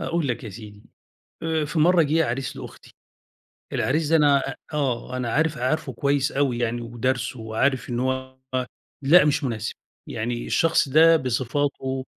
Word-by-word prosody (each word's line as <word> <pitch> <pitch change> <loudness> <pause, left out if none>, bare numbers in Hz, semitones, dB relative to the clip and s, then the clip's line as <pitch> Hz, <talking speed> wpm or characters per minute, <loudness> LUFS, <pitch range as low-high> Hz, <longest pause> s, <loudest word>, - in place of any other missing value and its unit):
أقول 165 -4 -1
لك 120 - -3
يا 110 - -5
سيدي 105 0 -11 0.6
آآ، 160 -2 0
في 155 +2 -2
مرّه 170 +1 +5
جه 160 +2 +2
عريس 130 +3 -3
لأختي، - - -11 0.8
العريس 150 +3 0
ده 165 - +4
أنا 145 -3 +2 0.2
آه 130 -4 -2
أنا 125 -2 -2
عارف 155 0 +1
عارفُه 155 +6 -1
كويّس 140 0 0
أوي 135 -4 0
يعني 120 0 -1
ودارسُه 120 +1 -2
وعارف 120 +4 -1
إنّه 125 +2 0
هو 130 0 -7 0.6
لأ 155 +6 +6
مش 150 0 +1
مناسب، 110 -4 -3 0.3
يعني 120 +2 -3
الشخص 165 -4 +2
ده 165 +4 +6
بصفاته 130 0 -2
135 Hz, 155 wpm, -24 LUFS, 120-150 Hz, 0.8 s, لأ